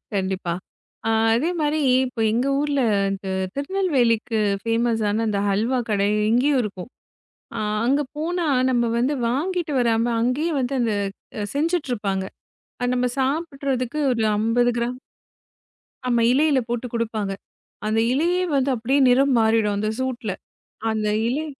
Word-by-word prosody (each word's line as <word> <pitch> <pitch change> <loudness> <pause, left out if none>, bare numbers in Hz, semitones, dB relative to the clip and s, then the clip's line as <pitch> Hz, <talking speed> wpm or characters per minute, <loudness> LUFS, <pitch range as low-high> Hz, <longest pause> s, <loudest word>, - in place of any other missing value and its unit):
கண்டிப்பா. 190 -3 -1 0.5
ஆ - - +2 0.2
அதே 295 +9 +1
மாரி 300 +1 +1 0.3
இப்ப 250 -2 -6
எங்க 240 +5 +1
ஊர்ல, 290 -1 0 0.3
இந்த 195 0 -5 0.3
திருநெல்வேலிக்கு 275 - +1 0.2
ஃபேமஸான 225 -2 0
அந்த 205 -1 0
ஹல்வா 225 +6 +1
கடை 200 -1 +2 0.2
இங்கயும் 260 +3 +3
இருக்கும். 200 -1 -6 0.7
ஆ - - -3 0.3
அங்க 275 +3 +3 0.2
போனா, 340 +2 -1 0.2
நம்ம 240 -1 +2
வந்து 260 +5 +1
வாங்கிட்டு 335 +5 -1
வராம, 230 -1 +2 0.2
அங்கயே 270 +8 0
வந்து 265 +1 -1
அந்த 230 -3 +1 0.6
செஞ்சுட்டு 315 0 0
இருப்பாங்க. 195 -4 -2 0.7
நம்ம 250 0 +1
சாப்பிட்றதுக்கு 275 -2 -1
ஒரு 230 -2 -1
50 230 +3 +2
கிராம். 240 +1 -2 1.1
ஆமா 240 -1 +2
இலையில 290 +1 +3
போட்டுக் 240 0 -3
குடுப்பாங்க. 220 -4 -2 0.5
அந்த 215 +1 +1
இலையே 350 +6 +1
வந்து 275 0 +2
அப்படியே 250 +5 +1
நிறம் 270 +2 +4
மாறிடும் 220 -2 +2
அந்த 215 +1 -1
சூட்டுல. 250 -5 -2 0.6
அந்த 215 -1 -1 0.2
இலை 290 +6 -1
245 Hz, 130 wpm, -23 LUFS, 225-280 Hz, 1.1 s, நிறம்